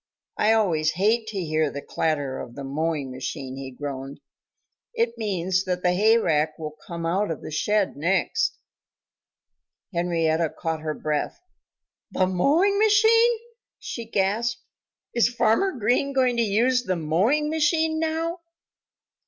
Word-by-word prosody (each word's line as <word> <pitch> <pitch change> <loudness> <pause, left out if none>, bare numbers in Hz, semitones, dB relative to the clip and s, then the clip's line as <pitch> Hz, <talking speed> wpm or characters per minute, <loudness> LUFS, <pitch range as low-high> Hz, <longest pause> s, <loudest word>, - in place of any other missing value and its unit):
I 215 +1 +3
always 165 -8 +2
hate 220 +6 +1
to 215 -3 -4
hear 155 -3 0
the 140 0 -7
clatter 145 -4 -1
of 120 - -8
the 140 - -7
mowing 145 0 -2
machine," 130 +1 -5
he 135 -1 -6
groaned. 135 +1 -6 0.8
"It 465 0 0
means 185 -3 -1
that 180 -1 -2
the 180 - +3
hayrake 175 -7 +2
will 155 -1 -5 0.2
come 170 -1 -5
out 190 +5 0
of 160 - -5
the - - -7
shed 210 +5 0
next." 190 - 0 1.4
Henrietta 170 -2 +1
Hen 160 - -1
caught 160 -1 -3
her 155 -1 -3
breath. 150 -1 -2 0.7
"The 185 - +1
mowing 305 - +2
machine!" 450 +2 +5 0.4
she 235 - -6
gasped. 220 +3 -1 0.5
"Is 235 -1 +3
Farmer 240 - +2
Green 250 +3 +1
going 255 -2 +2
to - - +3
use 235 +4 +2
the 185 -6 -1
mowing 200 - +1
machine 315 0 +1
now?" 325 +2 -1
190 Hz, 140 wpm, -24 LUFS, 155-250 Hz, 1.4 s, machine